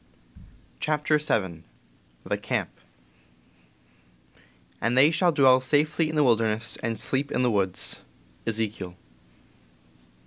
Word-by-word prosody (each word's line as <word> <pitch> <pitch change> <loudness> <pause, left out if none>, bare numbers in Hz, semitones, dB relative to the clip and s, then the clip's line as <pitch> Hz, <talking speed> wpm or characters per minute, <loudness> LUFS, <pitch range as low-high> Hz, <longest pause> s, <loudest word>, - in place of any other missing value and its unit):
CHAPTER 150 0 +1
VII 95 - -1 0.6
THE - - -2
CAMP - - -2 2.1
"And 120 +3 0
they 145 +4 +6
shall 170 +2 +2
dwell 130 -4 +5
safely 155 +4 +1
in 155 - -4
the 150 - +4
wilderness 115 -2 +1
and 115 -2 -3
sleep 135 +4 -1
in 125 - 0
the 125 - +2
woods. 95 -4 -1
" - - -32
— - - -33
Ezekiel. 105 -5 -2
125 Hz, 115 wpm, -26 LUFS, 110-150 Hz, 2.1 s, they